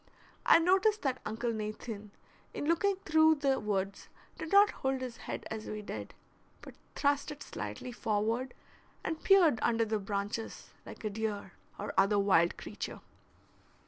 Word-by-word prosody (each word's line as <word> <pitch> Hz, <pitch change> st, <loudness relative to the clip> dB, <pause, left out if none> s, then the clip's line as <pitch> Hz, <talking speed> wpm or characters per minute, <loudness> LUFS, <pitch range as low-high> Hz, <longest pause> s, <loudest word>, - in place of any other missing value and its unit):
I -, -, +9 dB
noticed 385 Hz, +5 st, +3 dB
that 265 Hz, -3 st, -1 dB
Uncle 225 Hz, +2 st, -2 dB
Nathan, 215 Hz, 0 st, -5 dB, 0.5 s
in -, -, -3 dB
looking 340 Hz, +5 st, +2 dB
through 315 Hz, 0 st, +5 dB
the 275 Hz, -2 st, +1 dB
woods, 200 Hz, -2 st, -2 dB, 0.3 s
did 315 Hz, -, -5 dB
not 405 Hz, +1 st, +7 dB
hold 265 Hz, 0 st, -1 dB
his 255 Hz, -2 st, -5 dB
head -, -, -6 dB
as 220 Hz, -1 st, -5 dB
we 215 Hz, 0 st, -5 dB
did, -, -, -7 dB, 0.5 s
but -, -, -10 dB, 0.2 s
thrust 285 Hz, 0 st, +1 dB
it 295 Hz, -1 st, -7 dB
slightly 105 Hz, -, -6 dB
forward, 225 Hz, +3 st, -1 dB, 0.5 s
and 320 Hz, 0 st, -3 dB
peered 350 Hz, -, +6 dB
under 230 Hz, -1 st, +2 dB
the 215 Hz, 0 st, -1 dB
branches 205 Hz, +2 st, -4 dB
like -, -, -10 dB
a 215 Hz, -, -2 dB
deer 205 Hz, -2 st, -3 dB, 0.3 s
or -, -, -4 dB
other 200 Hz, +2 st, +4 dB
wild 190 Hz, -4 st, +3 dB
creature. -, -, -6 dB
230 Hz, 150 wpm, -32 LUFS, 210-300 Hz, 0.5 s, I